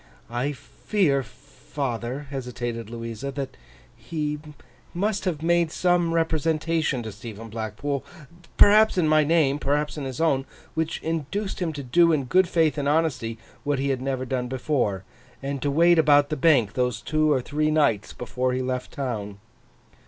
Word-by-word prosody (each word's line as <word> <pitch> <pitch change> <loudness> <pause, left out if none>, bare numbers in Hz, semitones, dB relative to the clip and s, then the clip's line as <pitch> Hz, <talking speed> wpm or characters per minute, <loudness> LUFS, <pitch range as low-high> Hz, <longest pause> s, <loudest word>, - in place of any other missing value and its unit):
'I 125 +5 -1
fear, 145 -1 0
father,' 135 -1 -5
hesitated 120 -4 -4
Louisa, 115 +3 -5
'that 135 -1 -5 0.4
he 150 -2 -3 0.6
must 200 +2 -1
have 160 -4 -2
made 170 -1 +2
some 175 -2 +2
representation 160 -3 0
to 110 - -5
Stephen 110 +2 -9
Blackpool—perhaps 145 - +1
in 170 -3 +3
my 155 0 +5
name, 150 -2 +2
perhaps 150 +2 -1
in 140 - -4
his 130 -2 -5
own—which 160 +1 -2
induced 165 +6 -3
him 175 -3 -1
to 145 -1 -6
do 170 +7 +4
in 150 -4 +1
good 185 +8 +3
faith 160 -4 +2
and 140 0 0
honesty, 145 -8 0 0.3
what 145 -1 0
he 140 +1 -1
had 130 -2 -1
never 130 -1 -2
done 125 -1 -2
before, 125 -7 -1 0.4
and 140 -1 -3
to 145 - 0
wait 170 +4 +5
about 145 -2 +5
the 155 - -1
Bank 135 -8 +3
those 125 -3 0
two 155 +5 +1
or 135 - +3
three 150 +4 -1
nights 145 -10 +2
before 125 +1 -2
he 130 - -1
left 125 0 -3
the - - -18
town. 105 -7 -4
145 Hz, 160 wpm, -25 LUFS, 125-160 Hz, 0.6 s, my